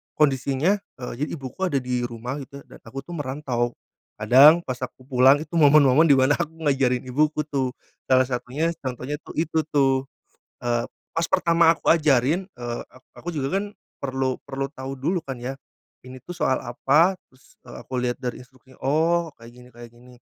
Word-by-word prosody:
kondisinya, 140 Hz, +6 st, +2 dB, 0.2 s
eee, 125 Hz, -, -5 dB
jadi -, -, -2 dB
ibuku 140 Hz, +7 st, -4 dB
ada 140 Hz, -5 st, 0 dB
di 125 Hz, -1 st, -2 dB
rumah, 125 Hz, +4 st, -6 dB
gitu. 140 Hz, +1 st, -10 dB
Dan -, -, -16 dB
aku 135 Hz, 0 st, -8 dB
tuh 175 Hz, -, -12 dB
merantau. 130 Hz, -4 st, -2 dB, 0.4 s
Kadang, 140 Hz, +10 st, +6 dB
pas 125 Hz, -1 st, -5 dB
aku 130 Hz, 0 st, -7 dB
pulang, 130 Hz, +1 st, +5 dB
itu 155 Hz, -, -21 dB
momen-momen 145 Hz, +1 st, +6 dB
di 140 Hz, -, +6 dB
mana 135 Hz, +2 st, +3 dB
aku 160 Hz, +2 st, -3 dB
ngajarin 135 Hz, -3 st, +1 dB
ibuku, 150 Hz, +4 st, 0 dB
tuh, 135 Hz, -4 st, -2 dB, 0.3 s
salah 130 Hz, 0 st, +5 dB
satunya, 130 Hz, +6 st, -2 dB
contohnya 130 Hz, +3 st, -5 dB
tuh -, -, -12 dB
itu 160 Hz, 0 st, 0 dB
tuh, 135 Hz, -2 st, +2 dB, 0.6 s
eee, 120 Hz, -1 st, 0 dB, 0.3 s
pas 165 Hz, 0 st, -1 dB
pertama 170 Hz, -2 st, +4 dB
aku -, -, 0 dB
ajarin, 155 Hz, +2 st, +3 dB
eee, 120 Hz, -9 st, -6 dB
ak 130 Hz, -, -20 dB, 0.2 s
aku 175 Hz, -1 st, -6 dB
juga 145 Hz, +6 st, -1 dB
kan, 200 Hz, -, -3 dB, 0.4 s
perlu 130 Hz, -1 st, -2 dB
perlu 135 Hz, 0 st, -3 dB
tahu 135 Hz, -2 st, -7 dB
dulu 170 Hz, +8 st, -1 dB
kan, 135 Hz, -1 st, -5 dB
ya. 135 Hz, +2 st, -4 dB, 0.5 s
Ini 130 Hz, 0 st, -10 dB
tuh 175 Hz, -, -7 dB
soal 130 Hz, -, +1 dB
apa, 150 Hz, +9 st, +2 dB
terus, 130 Hz, +1 st, -25 dB
eee, 120 Hz, -, -10 dB
aku -, -, -19 dB
lihat 120 Hz, +1 st, -2 dB
dari 125 Hz, -, -3 dB
instruksinya, 130 Hz, 0 st, -22 dB
oh, 165 Hz, +3 st, +1 dB
kayak 115 Hz, -, -12 dB
gini 125 Hz, +1 st, -16 dB
kayak 120 Hz, -1 st, -11 dB
gini. 125 Hz, +1 st, -17 dB
135 Hz, 180 wpm, -24 LUFS, 125-155 Hz, 0.6 s, Kadang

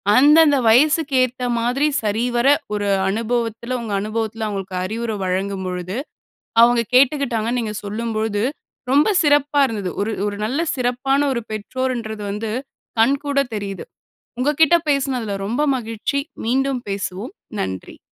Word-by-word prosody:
அந்தந்த 295 Hz, +2 st, +6 dB
வயசுக்கு 290 Hz, +5 st, +4 dB
ஏத்த 255 Hz, 0 st, -3 dB, 0.2 s
மாதிரி 250 Hz, +6 st, +1 dB, 0.2 s
சரிவர 240 Hz, +4 st, +1 dB, 0.3 s
ஒரு 205 Hz, -1 st, -1 dB, 0.2 s
அனுபவத்துல, 230 Hz, +2 st, -2 dB
உங்க 220 Hz, -3 st, -4 dB
அனுபவத்துல 220 Hz, +1 st, -3 dB
அவங்களுக்கு 195 Hz, -3 st, -4 dB
அறிவுர 225 Hz, +3 st, -3 dB
வழங்கும் 190 Hz, +1 st, -2 dB
பொழுது, 180 Hz, +3 st, -4 dB, 0.7 s
அவங்க 240 Hz, 0 st, +5 dB, 0.2 s
கேட்டுக்கிட்டாங்கன்னு 250 Hz, -4 st, +2 dB
நீங்க 220 Hz, -2 st, -3 dB
சொல்லும் 225 Hz, +3 st, -3 dB
பொழுது 215 Hz, -1 st, -1 dB, 0.5 s
ரொம்ப 285 Hz, +6 st, +4 dB
சிறப்பா 290 Hz, -1 st, +3 dB
இருந்தது. 205 Hz, -6 st, -3 dB
ஒரு 220 Hz, +2 st, -1 dB
ஒரு 205 Hz, 0 st, -3 dB
நல்ல 260 Hz, +8 st, -1 dB
சிறப்பான 255 Hz, +2 st, 0 dB
ஒரு 240 Hz, -, -1 dB
பெற்றோர்ன்றது 220 Hz, 0 st, -3 dB
வந்து 210 Hz, +2 st, -3 dB, 0.5 s
கண்கூட 280 Hz, +4 st, +2 dB, 0.2 s
தெரியுது. 200 Hz, -2 st, -5 dB, 0.6 s
உங்க 275 Hz, +4 st, +2 dB
கிட்ட 320 Hz, +2 st, +7 dB
பேசுனதுல 260 Hz, -7 st, 0 dB
ரொம்ப 235 Hz, +8 st, -1 dB, 0.2 s
மகிழ்ச்சி 230 Hz, +4 st, -2 dB, 0.2 s
மீண்டும் 265 Hz, +2 st, 0 dB
பேசுவோம். 200 Hz, -, -4 dB, 0.3 s
நன்றி. 95 Hz, -1 st, -5 dB
235 Hz, 125 wpm, -20 LUFS, 210-265 Hz, 0.7 s, கிட்ட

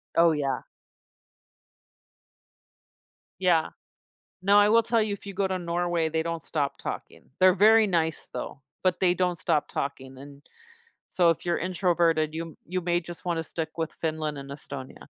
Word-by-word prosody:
Oh, 170 Hz, 0 st, +6 dB
yeah. 140 Hz, -3 st, -1 dB, 2.8 s
Yeah. 170 Hz, -3 st, +3 dB, 0.7 s
Now 200 Hz, +1 st, +6 dB
I 205 Hz, -, +6 dB
will 230 Hz, +1 st, +5 dB
tell 230 Hz, 0 st, +2 dB
you 210 Hz, -1 st, -1 dB
if 200 Hz, -, -9 dB
you 200 Hz, -, -6 dB
go 195 Hz, 0 st, 0 dB
to 190 Hz, -1 st, -1 dB
Norway, 170 Hz, -1 st, -1 dB
they 160 Hz, 0 st, 0 dB
don't 165 Hz, -2 st, -4 dB
stop 145 Hz, -3 st, -2 dB
talking. 80 Hz, -, -7 dB, 0.2 s
They're 185 Hz, 0 st, +7 dB
very 215 Hz, +2 st, +6 dB
nice 160 Hz, -4 st, 0 dB
though, 140 Hz, -, -6 dB, 0.2 s
but 185 Hz, -1 st, +2 dB
they 180 Hz, -2 st, +4 dB
don't 180 Hz, -2 st, 0 dB
stop 155 Hz, -4 st, +1 dB
talking, 135 Hz, -1 st, -4 dB
and 140 Hz, +1 st, -12 dB, 0.7 s
so 175 Hz, -2 st, +3 dB
if 165 Hz, -, -2 dB
you're 175 Hz, -1 st, 0 dB
introverted 170 Hz, -4 st, +1 dB
you 165 Hz, +1 st, -3 dB
m 165 Hz, -, -11 dB
you 185 Hz, +2 st, -2 dB
may 175 Hz, 0 st, +1 dB
just 175 Hz, +1 st, -9 dB
wanna 165 Hz, -2 st, 0 dB
stick 160 Hz, -1 st, -5 dB
with 160 Hz, -1 st, -2 dB
Finland 155 Hz, -2 st, -3 dB
and 140 Hz, 0 st, -8 dB
Estonia. 140 Hz, -2 st, -9 dB
170 Hz, 165 wpm, -27 LUFS, 155-185 Hz, 2.8 s, They're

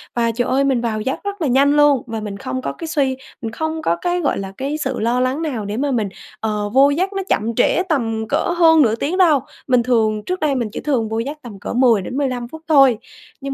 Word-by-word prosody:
và, 235 Hz, -1 st, +1 dB
trời 245 Hz, +2 st, -1 dB
ơi, 270 Hz, +2 st, +2 dB
mình 265 Hz, -3 st, +1 dB
vào 220 Hz, -2 st, -2 dB
giấc 260 Hz, +5 st, -2 dB
rất 405 Hz, -2 st, -5 dB
là 310 Hz, -, +1 dB
nhanh 275 Hz, +3 st, +3 dB
luôn. 290 Hz, -3 st, +4 dB
Và 225 Hz, -1 st, -4 dB
mình 205 Hz, -2 st, -6 dB
không 255 Hz, +3 st, -4 dB
có -, -, -4 dB
cái 330 Hz, -, -7 dB
suy 270 Hz, -4 st, 0 dB, 0.2 s
mình 225 Hz, -2 st, -4 dB
không 315 Hz, +5 st, -3 dB
có 170 Hz, -, +1 dB
cái, 355 Hz, 0 st, 0 dB
gọi 280 Hz, -, 0 dB
là, 195 Hz, 0 st, -6 dB
cái 280 Hz, +3 st, -2 dB
sự 265 Hz, -4 st, -3 dB
lo 235 Hz, +3 st, +1 dB
lắng 255 Hz, +4 st, 0 dB
nào 255 Hz, -10 st, -3 dB
để 205 Hz, +2 st, -4 dB
mà 280 Hz, +2 st, 0 dB
mình, 220 Hz, -6 st, 0 dB, 0.3 s
ờ, 210 Hz, -1 st, -2 dB
vô 275 Hz, +2 st, +6 dB
giấc 365 Hz, +7 st, -1 dB
nó 390 Hz, 0 st, -2 dB
chậm 225 Hz, +1 st, 0 dB
trễ 360 Hz, -, +2 dB
tầm 225 Hz, -7 st, -1 dB
cỡ -, -, 0 dB
hơn 325 Hz, -2 st, +6 dB
nửa 225 Hz, -4 st, +3 dB
tiếng 310 Hz, +10 st, -2 dB
đâu. 325 Hz, -6 st, +5 dB, 0.3 s
Mình 250 Hz, -2 st, +3 dB
thường 220 Hz, -3 st, +1 dB
trước 365 Hz, 0 st, -2 dB
đây 295 Hz, -3 st, +1 dB
mình 235 Hz, -4 st, -1 dB
chỉ -, -, -5 dB
thường 245 Hz, -7 st, 0 dB
vô 220 Hz, +1 st, -2 dB
giấc 280 Hz, +6 st, -4 dB
tầm 215 Hz, -5 st, -10 dB
cỡ -, -, -5 dB
10-15 250 Hz, +1 st, +1 dB
phút 320 Hz, +6 st, -11 dB
thôi. 275 Hz, -6 st, +5 dB, 0.4 s
Nhưng 275 Hz, 0 st, -4 dB
260 Hz, 255 wpm, -19 LUFS, 225-295 Hz, 0.4 s, vô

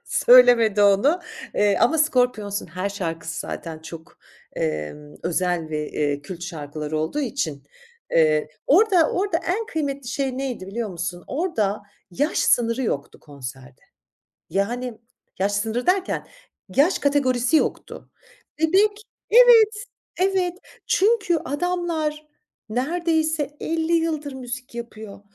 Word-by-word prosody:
söylemedi 240 Hz, -4 st, +6 dB
onu, 245 Hz, -, +4 dB, 0.3 s
eee, 205 Hz, -1 st, +3 dB
ama 310 Hz, +7 st, +3 dB
Scorpions'un 245 Hz, -8 st, +1 dB
her 185 Hz, +2 st, -3 dB
şarkısı 165 Hz, -4 st, -4 dB
zaten 160 Hz, -2 st, -6 dB
çok, 160 Hz, +1 st, -11 dB, 0.4 s
emm, 80 Hz, -, -4 dB
özel 175 Hz, -2 st, -1 dB
ve, 150 Hz, -1 st, -3 dB
eee, 145 Hz, -1 st, -1 dB
kült 175 Hz, +2 st, -8 dB
şarkıları 155 Hz, -2 st, -5 dB
olduğu 160 Hz, -, -2 dB
için, 165 Hz, -, -3 dB, 0.5 s
eee, 155 Hz, -2 st, +3 dB, 0.2 s
orada 365 Hz, 0 st, +4 dB
orada 385 Hz, -2 st, 0 dB
en 420 Hz, +6 st, -2 dB
kıymetli 280 Hz, -, -3 dB
şey 265 Hz, 0 st, -2 dB
neydi, 250 Hz, -8 st, -4 dB
biliyor 220 Hz, +2 st, -4 dB
musun? 175 Hz, 0 st, -5 dB
Orada 225 Hz, -, -1 dB, 0.3 s
yaş 290 Hz, -, 0 dB
sınırı 235 Hz, +1 st, +2 dB
yoktu 140 Hz, -, -3 dB
konserde. 130 Hz, -2 st, -10 dB, 0.7 s
Yani, 235 Hz, +4 st, -2 dB, 0.4 s
yaş 200 Hz, +2 st, +1 dB
sınırı 220 Hz, +4 st, -1 dB
derken, 375 Hz, +1 st, 0 dB, 0.5 s
yaş 320 Hz, +7 st, +4 dB
kategorisi 275 Hz, -1 st, +2 dB
yoktu. -, -, -2 dB, 0.5 s
Bebek, 410 Hz, +6 st, +3 dB, 0.3 s
evet, 460 Hz, -2 st, +7 dB, 0.4 s
evet 370 Hz, -1 st, +1 dB, 0.3 s
çünkü 410 Hz, -4 st, +2 dB
adamlar 315 Hz, -1 st, -2 dB, 0.4 s
neredeyse 315 Hz, +3 st, -1 dB
50 325 Hz, +1 st, -1 dB
yıldır 320 Hz, -3 st, 0 dB
müzik 255 Hz, -1 st, -7 dB
yapıyor. 220 Hz, -4 st, -8 dB
245 Hz, 115 wpm, -23 LUFS, -, 0.7 s, evet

